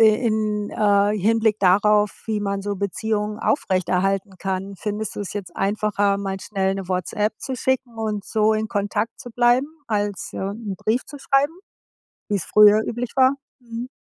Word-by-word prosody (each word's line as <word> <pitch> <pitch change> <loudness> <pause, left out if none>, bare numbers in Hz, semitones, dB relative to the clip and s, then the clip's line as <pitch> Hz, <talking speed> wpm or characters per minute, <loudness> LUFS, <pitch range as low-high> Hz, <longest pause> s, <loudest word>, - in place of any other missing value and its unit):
i 220 - +8
in, 215 -2 0
äh, 205 0 +2
Hinblick 220 +1 +2
darauf, 205 +2 +3
wie 215 -2 -1
man 200 -1 -2
so 205 0 -3
Beziehungen 210 +2 -2
aufrechterhalten 190 - 0
kann? 195 +1 -3
Findest 210 +2 -4
du - - -3
es 205 - -5
jetzt 190 -4 -6
einfacher, 205 0 +1
mal 195 -1 -4
schnell 195 -1 -1
'ne 195 -2 -6
WhatsApp 200 +4 -1
zu 265 - -4
schicken 255 -1 -1
und 210 -3 -2
so 220 0 +2
in 215 0 -1
Kontakt 205 +1 -2
zu 260 - -8
bleiben 245 +3 +3 0.2
als, 205 -3 -2
ja, 190 - -3
'n 205 -3 -6
Brief 230 +4 0
zu 290 - -10
schreiben, 275 +2 +2 0.8
wie's 200 -4 -1
früher 210 0 +6
üblich 240 +1 -4
war? 260 -1 +6 0.3
Mhm. 235 0 -6
210 Hz, 165 wpm, -22 LUFS, 200-225 Hz, 0.8 s, i